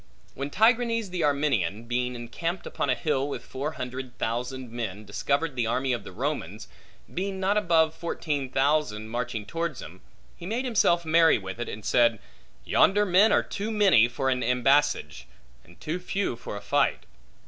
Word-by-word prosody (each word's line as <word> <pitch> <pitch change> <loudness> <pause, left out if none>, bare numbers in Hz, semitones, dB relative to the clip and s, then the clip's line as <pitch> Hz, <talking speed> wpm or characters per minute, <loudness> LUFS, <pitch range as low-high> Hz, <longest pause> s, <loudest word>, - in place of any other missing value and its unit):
When 140 +1 -4
Tigranes 230 - +2
the 180 -2 -2
Armenian, 140 -8 +1
being 125 +1 -2
encamped 165 +10 -4
upon 140 - -2
a 130 - +3
hill 140 0 -1
with - - -6
four 145 +4 -4
hundred 130 0 -6
thousand 125 +2 -3
men, 110 -3 -5
discovered 140 +8 -1
the 120 -3 0
army 130 +2 0
of 115 -4 -3
the - - -9
Romans, 115 - -4 0.5
being 190 +1 -3
not 195 +2 +1
above 165 -6 +3
fourteen 150 -4 -3
thousand, 135 -6 0
marching 120 -2 -3
towards 165 +2 -3
him, 90 +4 -10 0.3
he 170 - -9
made 235 +6 -2
himself 190 -8 +2
merry 165 0 +5
with 95 +1 -7
it, 120 - -3
and 105 0 -8
said, 115 -2 +3 0.5
Yonder 205 +2 +4
men 195 +3 +5
are - - +4
too 210 +2 -4
many 195 - +5
for 130 +2 -1
an 125 -1 0
embassage, 125 - +1 0.4
and 85 +1 -19
too 155 - -3
few 190 -5 -2
for 105 - -7
a - - -8
fight. - - +1
135 Hz, 170 wpm, -26 LUFS, 120-170 Hz, 0.5 s, merry